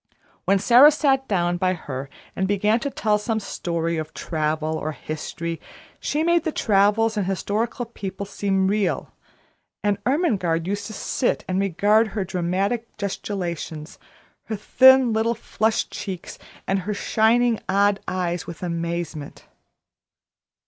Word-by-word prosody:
When 195 Hz, -, +4 dB
Sara 245 Hz, +8 st, +7 dB
sat 275 Hz, -3 st, +1 dB
down 175 Hz, -3 st, +1 dB
by 185 Hz, +1 st, +1 dB
her 135 Hz, -4 st, -6 dB, 0.3 s
and 190 Hz, -, 0 dB
began 210 Hz, +3 st, +2 dB
to 280 Hz, -, -2 dB
tell 215 Hz, -5 st, +1 dB
some 220 Hz, +1 st, -1 dB
story 170 Hz, -4 st, -2 dB
of 155 Hz, 0 st, -5 dB
travel 155 Hz, 0 st, -1 dB
or 155 Hz, 0 st, -3 dB
history, 165 Hz, +2 st, -5 dB, 0.4 s
she 300 Hz, +2 st, -1 dB
made 340 Hz, -1 st, +3 dB
the 320 Hz, -, -1 dB
travellers 215 Hz, 0 st, +2 dB
and 195 Hz, -3 st, 0 dB
historical 215 Hz, +5 st, -2 dB
people 200 Hz, -3 st, -6 dB
seem 195 Hz, -1 st, 0 dB
real; 200 Hz, -2 st, -1 dB, 0.7 s
and 205 Hz, -1 st, +1 dB
Ermengarde 200 Hz, -, +1 dB
used 200 Hz, +1 st, -2 dB
to 220 Hz, -, -8 dB
sit 240 Hz, -, -1 dB
and 185 Hz, 0 st, 0 dB
regard 205 Hz, +4 st, +3 dB
her 215 Hz, -2 st, -3 dB
dramatic 190 Hz, +7 st, -2 dB
gesticulations, 175 Hz, -6 st, -4 dB, 0.5 s
her 220 Hz, -, -3 dB
thin 260 Hz, +3 st, +6 dB
little 225 Hz, +2 st, +1 dB
flushed 220 Hz, 0 st, -1 dB
cheeks, 185 Hz, -4 st, -6 dB, 0.3 s
and 195 Hz, 0 st, +1 dB
her 205 Hz, +3 st, -3 dB
shining, 230 Hz, +2 st, +2 dB
odd 200 Hz, +1 st, +3 dB
eyes 175 Hz, -2 st, -2 dB
with 170 Hz, +1 st, -8 dB
amazement. 170 Hz, -3 st, -4 dB
200 Hz, 135 wpm, -23 LUFS, 175-225 Hz, 0.7 s, Sara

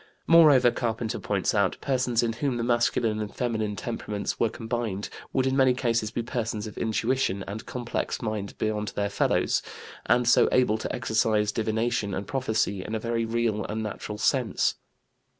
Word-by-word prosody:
Moreover, 150 Hz, -7 st, +7 dB
Carpenter 115 Hz, -2 st, -2 dB
points 100 Hz, -3 st, 0 dB
out, 100 Hz, -4 st, +2 dB
persons 125 Hz, -3 st, +1 dB
in 115 Hz, -1 st, 0 dB
whom 130 Hz, +1 st, -1 dB
the 115 Hz, -, -1 dB
masculine 120 Hz, -2 st, +1 dB
and 105 Hz, -1 st, -5 dB
feminine 110 Hz, -4 st, -1 dB
temperaments 105 Hz, -1 st, -4 dB
were 115 Hz, -, +3 dB
combined 115 Hz, -4 st, -3 dB, 0.2 s
would 130 Hz, -, +1 dB
in 130 Hz, 0 st, +1 dB
many 130 Hz, -2 st, +4 dB
cases 115 Hz, -4 st, 0 dB
be 115 Hz, +2 st, -3 dB
persons 115 Hz, -3 st, -3 dB
of 105 Hz, -, -8 dB
intuition 110 Hz, -2 st, 0 dB
and 105 Hz, +3 st, -6 dB
complex 120 Hz, -2 st, -3 dB
mind 110 Hz, -3 st, -4 dB
beyond 105 Hz, -1 st, -1 dB
their 100 Hz, 0 st, -1 dB
fellows, -, -, +1 dB, 0.5 s
and 120 Hz, +1 st, +3 dB
so 120 Hz, -, +5 dB
able 110 Hz, -4 st, +3 dB
to -, -, -4 dB
exercise 110 Hz, -2 st, +1 dB
divination 110 Hz, -2 st, -1 dB
and 100 Hz, -, -4 dB
prophecy 110 Hz, -7 st, -1 dB
in 110 Hz, -, -4 dB
a -, -, -1 dB
very 115 Hz, 0 st, -1 dB
real 115 Hz, -2 st, 0 dB
and 110 Hz, +1 st, -3 dB
natural 105 Hz, 0 st, -5 dB
sense. 120 Hz, -1 st, +1 dB
115 Hz, 170 wpm, -26 LUFS, 105-120 Hz, 0.5 s, Moreover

